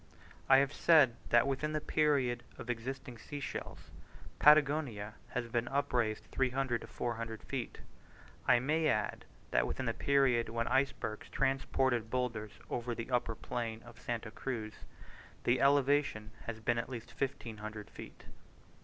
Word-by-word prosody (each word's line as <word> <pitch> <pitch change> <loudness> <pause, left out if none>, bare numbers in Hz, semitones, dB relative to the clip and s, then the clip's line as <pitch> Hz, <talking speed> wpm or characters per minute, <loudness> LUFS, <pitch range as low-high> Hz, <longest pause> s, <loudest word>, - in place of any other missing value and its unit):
I 135 - +9
have 140 +1 +2
said 145 -7 +5
that 120 0 +5
within 140 +3 -1
the 155 - +1
period 140 -6 +1 0.2
of 120 - -3
existing 125 0 -6
sea 145 +6 -7
shells, 140 - -6 0.5
Patagonia 145 -8 +4 0.2
has 125 -1 0
been 120 +1 -1
upraised 125 -6 0
300 130 -2 0
to - - -9
400 115 -2 -4
feet: 130 -4 -5 0.7
I - - +7
may 155 +6 +1
add, 105 -8 0 0.3
that - - +3
within - - -3
the - - 0
period 135 -5 +2
when 115 +1 -1
icebergs 125 -4 0
transported 130 -3 +1
boulders 115 -4 -2
over 120 0 -3
the 115 +2 -6
upper 120 -2 +1
plain 115 -1 -4
of 120 -2 -14
Santa 115 -2 -3
Cruz, 115 -3 -4 0.7
the 120 +1 +2
elevation 140 -6 +3 0.2
has 115 -1 -4
been 115 +1 +1
at 115 - -4
least 120 -3 -7
1500 110 -5 -4
feet. - - -11
120 Hz, 145 wpm, -33 LUFS, 115-135 Hz, 0.7 s, I